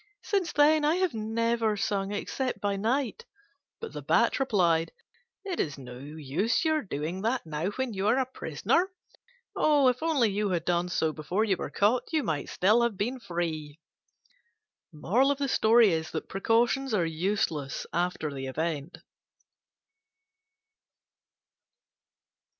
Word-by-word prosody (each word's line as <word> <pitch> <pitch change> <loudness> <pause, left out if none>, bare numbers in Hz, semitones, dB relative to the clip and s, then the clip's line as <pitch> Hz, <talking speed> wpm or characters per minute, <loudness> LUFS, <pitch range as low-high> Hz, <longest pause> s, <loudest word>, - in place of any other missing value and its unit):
Since 385 -4 -1
then 300 +1 +4
I 305 +3 +3
have 370 -1 0
never 225 0 0
sung 195 0 -1
except 255 +5 -3
by 200 -1 -1
night." 255 - -1 0.5
But 455 - -7
the - - -6
Bat - - +2
replied, 170 -10 +2 0.5
"It 370 -4 -3
is 145 -3 -1
no 125 -2 -10
use 150 - -1
your 315 -1 +2
doing 170 - -4
that 235 +2 -1
now 160 +3 -2
when 260 -3 -2
you 195 +1 -1
are 230 +4 +4
a 265 - +2
prisoner: 335 +7 0 0.7
if 275 -5 +3
only 290 -10 +2
you 205 +1 -1
had 175 -3 -1
done 175 0 +1
so 160 -3 0
before 175 +8 -1
you 205 -4 +2
were - - -5
caught, 220 +5 +1
you 310 -3 +1
might 155 - -2
still 215 +6 +3
have 235 -4 0
been 245 +6 -2
free." 165 -6 -4 1.1
Precautions 265 - +1 1.4
are 175 -5 +2
useless 160 -4 -2
after 175 -4 -1
the 135 -1 -5
event. 155 +2 -3
205 Hz, 125 wpm, -28 LUFS, 165-260 Hz, 1.4 s, then